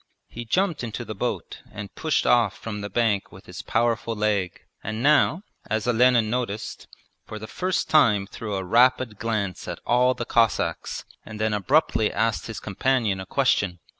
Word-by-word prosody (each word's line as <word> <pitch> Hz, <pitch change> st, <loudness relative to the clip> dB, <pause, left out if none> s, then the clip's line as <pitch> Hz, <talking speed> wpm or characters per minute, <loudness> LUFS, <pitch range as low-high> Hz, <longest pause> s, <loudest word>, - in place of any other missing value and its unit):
He 120 Hz, +1 st, -7 dB
jumped 175 Hz, -, 0 dB
into 120 Hz, +1 st, -5 dB
the 110 Hz, -, -5 dB
boat 95 Hz, -, -4 dB
and 105 Hz, -1 st, -8 dB
pushed 160 Hz, -2 st, 0 dB
off 115 Hz, -5 st, +3 dB
from 105 Hz, -2 st, -6 dB
the 100 Hz, -, -5 dB
bank 105 Hz, -2 st, 0 dB
with 95 Hz, +1 st, -14 dB
his 90 Hz, +1 st, -8 dB
powerful 115 Hz, 0 st, 0 dB
leg, 105 Hz, -4 st, -1 dB, 0.2 s
and 110 Hz, +2 st, -4 dB
now, 150 Hz, +5 st, +3 dB, 0.3 s
as 110 Hz, 0 st, -1 dB
Olenin 120 Hz, -1 st, +4 dB
noticed, 115 Hz, -2 st, -4 dB, 0.4 s
for 110 Hz, -, -7 dB
the 110 Hz, -, -7 dB
first 185 Hz, +9 st, -2 dB
time 110 Hz, -10 st, +4 dB
threw 105 Hz, 0 st, -6 dB
a 95 Hz, -, -2 dB
rapid 120 Hz, +1 st, +3 dB
glance 105 Hz, -5 st, -2 dB
at -, -, -4 dB
all 125 Hz, +1 st, +3 dB
the 120 Hz, -, -4 dB
Cossacks 115 Hz, -3 st, 0 dB, 0.2 s
and 110 Hz, -1 st, -9 dB
then 110 Hz, 0 st, 0 dB
abruptly 110 Hz, +1 st, +2 dB
asked 110 Hz, +1 st, -1 dB
his 110 Hz, -1 st, -6 dB
companion 110 Hz, -1 st, 0 dB
a 95 Hz, -, -7 dB
question. 90 Hz, -3 st, +1 dB
110 Hz, 170 wpm, -24 LUFS, 105-125 Hz, 0.4 s, Olenin